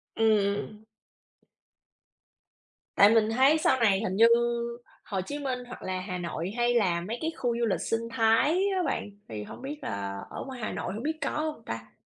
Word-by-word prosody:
Ừm, 220 -1 +4 0.2
ừm. 210 +1 -7 2.1
Tại 200 - +8
mình 220 -1 +4
thấy 270 +6 +5
sau 265 -4 +2
này 205 -5 +4
hình 190 -3 -2
như 225 - +7 0.8
Hồ 195 -2 -3
Chí 285 +10 -5
Minh, 260 -3 -2
hoặc 250 - -9
là 185 0 -2
Hà 185 -1 -4
Nội, 175 +1 -4
hay 240 0 +2
là 180 -7 +2
mấy 220 +7 -4
cái 320 +1 -1
khu 240 -2 0
du 235 - +2
lịch 205 - 0
sinh 230 0 -2
thái 225 +3 +3 0.3
á 365 - +1
bạn, 270 - -2 0.2
thì 105 -2 -5
hổng - - -10
biết 285 +3 -5
là 100 -1 -4
ở - - -6
ngoài 260 -2 -7
Hà - - -2
Nội - - -4
hổng 220 - -5
biết 315 +1 -1
có - - 0
hông 305 -5 -3
ta? 115 0 -6
225 Hz, 200 wpm, -28 LUFS, 185-255 Hz, 2.1 s, Tại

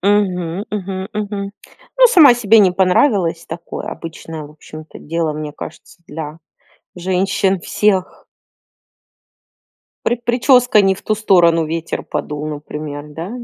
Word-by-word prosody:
Мгм, 190 -2 0
мгм, 190 -2 -4
мгм. 205 -1 -4 0.5
Ну, - - +8
сама 330 - +7
себе 225 -2 +4
не 195 -3 +6
понравилась. 185 - +2
Такое, 170 +1 -7
обычное, 165 -1 -7
в 145 - -11
общем-то 155 +1 -12
дело, 165 0 -2
мне 150 0 -6
кажется, 160 - -11
для 155 -1 -7 0.6
женщин 190 +1 0
всех. 190 +1 0 1.8
При 240 - +2
прическа 245 -1 +4
не 195 0 +3
в - - -14
ту 215 - 0
сторону, 175 -6 +3
ветер 165 +1 -4
подул, 150 0 -4
например, 150 -1 -6
да? 165 +5 -7
185 Hz, 125 wpm, -18 LUFS, 160-205 Hz, 1.8 s, Ну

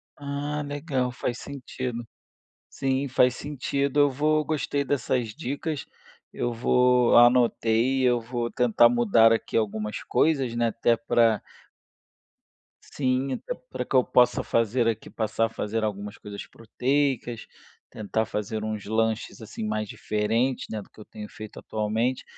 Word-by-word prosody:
Ah, 145 +1 -4
legal, 140 -3 -2
faz 120 0 -4
sentido. 125 -3 -6 0.6
Sim, 135 +1 -1
faz 125 -1 +3
sentido. 140 0 -1
Eu 145 -1 +5
vou 155 +3 +1
gostei 145 -2 -1
dessas 125 -3 0
dicas, 145 +3 -4 0.5
eu 120 - -2
vou 125 +1 +3
anotei, 120 +1 +4
eu 125 -1 +3
vou 120 0 -3
tentar 120 -1 +4
mudar 115 -1 +4
aqui 115 - -1
algumas 105 -1 -2
coisas, 135 -7 +1
né, 120 0 +2
até 115 +1 +2
para 115 -6 +2 1.4
Sim, 130 0 -1
até - - -4 0.2
para - - -3
que - - -3
eu 130 - +6
possa 125 0 +3
fazer 115 +1 +1
aqui, 110 -1 -2
passar 115 0 0
a - - -3
fazer 110 0 -3
algumas 105 -1 -4
coisas 100 -1 -8
proteicas, 125 0 -1 0.4
tentar 110 +1 -2
fazer 105 0 -4
uns 110 -2 -4
lanches 110 +1 -1
assim 110 0 -7
mais 105 0 -2
diferentes, 115 +5 -1
né, 110 -1 -4
do - - -16
que - - -20
eu 105 - -10
tenho 105 -1 -9
feito 110 -1 -10
atualmente. 110 +4 -1
120 Hz, 140 wpm, -26 LUFS, 110-135 Hz, 1.4 s, eu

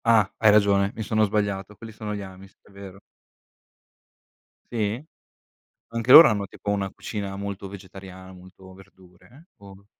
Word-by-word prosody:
Ah. 110 -4 +3
Hai 110 - +5
ragione, 100 -1 +3
mi 110 - -5
sono 110 +1 0
sbagliato, 100 -1 -3
quelli 115 +2 -11
sono 105 -1 -6
gli 100 - -6
amish, 95 0 -13
è - - -22
vero. 100 -1 -12 1.7
Sì? 115 +4 -3 0.9
Anche 115 +2 -1
loro 160 +5 +11
hanno 105 -3 -1
tipo 100 - -6
una 100 -1 -2
cucina 100 -2 -6
molto 100 -1 -6
vegetariana, 95 -1 -12
molto 95 +1 -16
verdure 95 - -20
o 100 0 -15
100 Hz, 145 wpm, -24 LUFS, 95-105 Hz, 1.7 s, loro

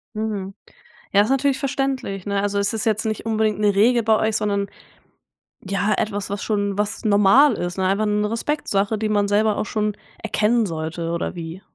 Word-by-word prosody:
Mhm. 210 -3 -3 0.6
Ja, 200 - +5
ist 215 - -2
natürlich 270 0 +2
verständlich, 265 -8 -2
ne? 200 -1 0
Also, 200 0 -1
es 200 +1 0
ist 220 -2 -3
jetzt 220 -1 0
nicht 215 0 -3
unbedingt 220 -1 +1
'ne 205 -1 +3
Regel 235 +4 +4
bei 220 0 +3
euch, 220 0 0
sondern 200 -2 -1 0.9
ja, 200 +2 0
etwas, 205 -2 -2
was 200 +1 -4
schon 205 -2 -1
was 210 +2 -2
normal 215 +6 +5
ist, 175 -1 -4
ne 190 - 0
einfach 200 +3 +1
'ne 210 0 0
Respektsache, 225 -5 -1
die 215 0 -2
man 205 -1 +2
selber 210 +1 +2
auch - - -1
schon 210 0 -1 0.3
erkennen 225 +2 +2
sollte 165 -1 -4
oder 170 +1 -3
wie? 165 +2 -7
210 Hz, 190 wpm, -22 LUFS, 200-220 Hz, 0.9 s, Ja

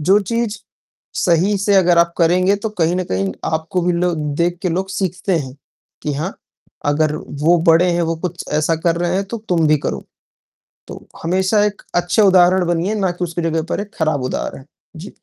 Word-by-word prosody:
जो 190 +7 +4
चीज़ 230 -2 -1 0.6
सही 185 +3 +2
से 200 +1 +1
अगर 175 -3 +4
आप 170 0 +3
करेंगे, 180 +4 +3
तो 215 +2 -3
कहीं 165 +2 +2
न 185 - -1
कहीं 95 0 -1
आपको 160 +3 -1
भी 180 +1 +1
लो 175 0 0 0.3
देख 175 +1 +1
के 185 - 0
लोग 185 +3 -2
सीखते 190 -1 -1
हैं 130 -4 -6 0.5
कि 150 - -2
हाँ, 160 +8 -3 0.5
अगर 150 +1 +1
वो 155 +3 +1
बड़े 170 +2 +5
हैं, 170 0 +1
वो 165 0 -1
कुछ 175 0 -7 0.2
ऐसा 160 +2 +1
कर 170 -1 +3
रहे 175 0 0
हैं, 195 +1 0
तो 230 +4 -6
तुम 165 -3 +2
भी 155 - +5
करो। - - -3 0.8
तो - - -10 0.2
हमेशा 190 +5 +2
एक 210 -1 -3
अच्छे 175 +5 +2
उदाहरण 185 -2 +5
बनिए, 175 +4 0
ना 195 -4 0
कि 180 0 -3
उसकी 170 0 -4
जगह 165 -1 0
पर - - -1
एक 205 +2 -8
ख़राब 155 -4 0
उदाहरण। 135 - -4 0.3
जी। 170 +6 -8
175 Hz, 195 wpm, -18 LUFS, 165-190 Hz, 0.8 s, बड़े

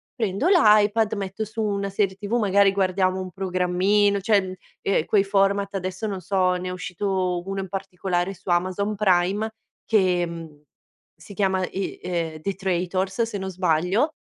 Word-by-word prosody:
prendo 215 - -1
l'iPad, 215 - +4
metto 195 +1 -4
su 220 +1 -5
una 200 -2 -1
serie 195 -1 0
TV, 205 +3 -6
magari 200 -2 +4
guardiamo 190 -1 +1
un 185 -1 -7
programmino 190 +2 +1
cioè, 205 +1 +3
mhmm, 185 -1 -6 0.3
ehm, 195 -5 +1
quei 200 0 +3
format, 195 0 +1
adesso 185 +3 -3
non 195 -3 -4
so, 185 0 +1
ne 180 0 -4
è - - -4
uscito 185 -1 -2
uno 195 0 -3
in 190 - -7
particolare 190 -1 -2
su 190 0 -11
Amazon 185 +4 0
Prime 195 +2 +1 0.3
che, 185 -5 +2
mhmm, 165 -3 -9 0.5
si - - -13
chiama, 190 -1 +1
i 195 0 -5
ehm, 165 -3 -3
The 195 +5 -2
Traitors 190 +2 -1
se 225 -2 -4
non 190 -1 -4
sbaglio, 185 - +1
195 Hz, 165 wpm, -24 LUFS, 180-200 Hz, 0.5 s, l'iPad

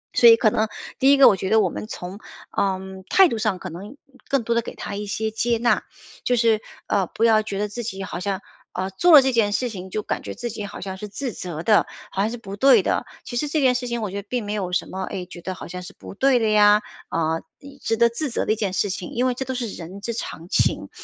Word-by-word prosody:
所 235 - +8
以 230 - +9
可 220 -1 +3
能， 220 +1 +1 0.3
第 270 +1 +5
1 280 - +6
个 275 - +9
我 - - +6
觉 190 0 -3
得 220 +1 +5
我 195 -4 +2
们 - - -6
从， 185 -2 -7 0.4
呃， 195 -1 +1 0.3
态 385 -1 +7
度 230 -9 -3
上 215 -4 0
可 185 - -7
能 200 - -9 0.3
更 275 -3 +1
多 235 - 0
的 235 - +3
给 - - -8
它 - - -6
一 205 +1 -4
些 220 +2 -2
接 230 +2 0
纳， 235 +1 +2 0.4
就 250 - +2
是， 225 -2 +3 0.2
呃， 195 -3 +1
不 220 - -3
要 220 -2 +5
觉 210 -2 -5
得 210 +1 0
自 210 +4 -6
己 195 -3 -5
好 175 - -5
像， 195 0 -2 0.3
呃， 190 +1 -3
做 345 - +3
了 295 -4 +10
这 265 - +2
件 225 -4 +2
事 245 +4 0
情， 190 -4 -8
就 215 +3 -3
感 - - -3
觉 - - -7
自 240 +1 -4
己 210 -1 -6
好 - - -9
像 190 -1 -5
是 210 - -6
自 240 +4 -5
责 170 -4 -6
的， 210 +1 +4 0.2
好 195 - -1
像 210 - +1
是 240 - -5
不 200 -4 -8
对 270 +6 +6
的。 - - 0 0.2
其 240 - -7
实 300 - 0
这 305 +2 0
件 260 -3 +4
事 250 0 -2
情 235 -1 -2
我 205 - -3
觉 200 +1 -4
得 200 - -23
并 245 -4 -2
没 205 - -3
有 190 -4 -2
什 180 - 0
么， 190 - -6
哎， 185 -1 -5
觉 175 -1 -11
得 185 +2 -5
好 - - -9
像 180 +1 -6
是 180 - -10
不 - - -10
对 260 +5 +3
的 225 -2 +1
呀， 210 0 +6 0.3
啊， 160 0 0 0.4
值 225 - 0
得 235 +1 +6
自 275 +6 -3
责 - - -1
的 - - +1
一 - - -2
件 205 -3 -1
事 200 +2 0
情， 185 -1 -5
因 245 +2 +1
为 255 - +2
这 265 +2 -4
都 260 0 -3
是 245 -2 -2
人 185 -1 -8
之 235 +3 -3
常 170 -6 -6
情， - - +1
215 Hz, 300 characters per minute, -23 LUFS, 195-240 Hz, 0.4 s, 了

